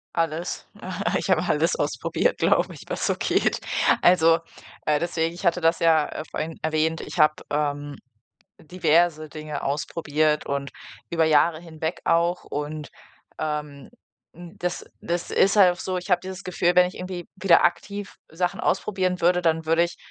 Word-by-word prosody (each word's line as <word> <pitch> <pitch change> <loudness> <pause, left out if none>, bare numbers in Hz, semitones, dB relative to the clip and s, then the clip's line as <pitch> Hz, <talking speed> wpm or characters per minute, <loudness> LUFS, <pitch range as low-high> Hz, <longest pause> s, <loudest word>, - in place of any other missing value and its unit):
Alles. 165 +1 -2 0.5
Ich - - -4
habe - - +4
alles - - +2
ausprobiert, - - 0
glaube - - +2
ich, - - -12
was - - -3
so - - +1
geht. - - 0 0.4
Also, 165 -2 +5 0.5
äh, 150 -1 +2
deswegen, 165 0 -1
ich 175 +3 -8
hatte 175 +1 +2
das 165 +1 +2
ja, 160 -2 +4
äh, - - -5
vorhin 160 +1 -5
erwähnt, 160 +1 0
ich - - -8
habe, 155 0 +5
ähm, 145 -1 -2 0.7
diverse 160 -1 +1
Dinge 155 -1 -6
ausprobiert 150 +1 0
und 140 0 -3 0.4
über 165 -1 +2
Jahre 160 +1 +3
hinweg 160 0 -5
auch 170 +2 +1
und, 150 +1 -5 0.5
ähm, 150 -2 -4 0.5
n 175 0 -12
das 180 0 -3 0.2
das 175 0 -3
ist 195 +2 +3
halt 190 -3 +7
auch 180 - -12
so, 185 -1 -3
ich 180 +2 -6
habe 180 -1 +4
dieses 190 0 -7
Gefühl, 180 -1 +1
wenn 180 0 +6
ich 180 - -7
irgendwie 180 -1 -6
wieder 190 -3 +4
aktiv 200 +3 -2
Sachen 180 +4 -2
ausprobieren 185 -2 0
würde, 180 +1 +4
dann 160 -2 +1
würde 165 +2 +3
ich 175 - -6
165 Hz, 165 wpm, -24 LUFS, 155-180 Hz, 0.7 s, halt